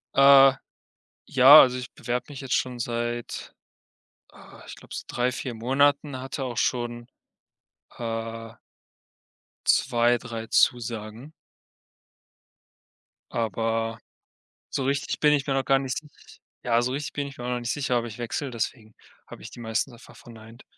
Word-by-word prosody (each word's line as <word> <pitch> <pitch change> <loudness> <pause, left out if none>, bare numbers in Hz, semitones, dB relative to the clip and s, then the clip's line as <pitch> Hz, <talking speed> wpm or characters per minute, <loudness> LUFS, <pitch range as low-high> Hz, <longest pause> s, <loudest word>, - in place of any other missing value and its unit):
Äh, 135 -1 +8 0.7
ja, 135 +4 +9
also 125 -1 +2
ich 125 -2 -7
bewerbe 125 0 -3
mich 145 -2 -8
jetzt 130 -1 -3
schon 125 -1 -1
seit, 120 0 -4 0.8
ah, - - -16
ich - - -10
glaube - - -12
so, - - -5
3, 125 +1 0
4 125 -1 -5
Monaten, 135 +3 +1
hatte 135 +1 -5
auch 125 -2 -5
schon, 120 0 -2 0.9
äh 115 -1 -5 1.1
2, 120 -1 +3
3 115 -2 -7
Zusagen. 115 +2 0 2.0
Aber, 115 0 -2 0.7
so 135 - -2
richtig 140 +1 -1
bin 150 -1 +4
ich 140 -2 0
mir 140 - -1
noch 135 -1 0
gar 135 - +4
nicht 135 -1 -3
sich 150 -1 -19 0.5
ja, 120 -1 +2
so 125 - -1
richtig 140 +2 -4
bin 145 -1 -3
ich 140 - -11
mir 120 - -7
auch - - -2
noch 125 0 -1
nicht 120 0 -3
sicher, 135 -4 0
ob 120 - -2
ich 115 0 -9
wechsle, 125 +3 -4
deswegen 110 -1 -5 0.3
habe - - -12
ich - - -9
die - - -13
meistens 115 +3 -2
einfach 120 0 -16
verneint. 115 +1 -14
125 Hz, 155 wpm, -25 LUFS, 115-135 Hz, 2.0 s, ja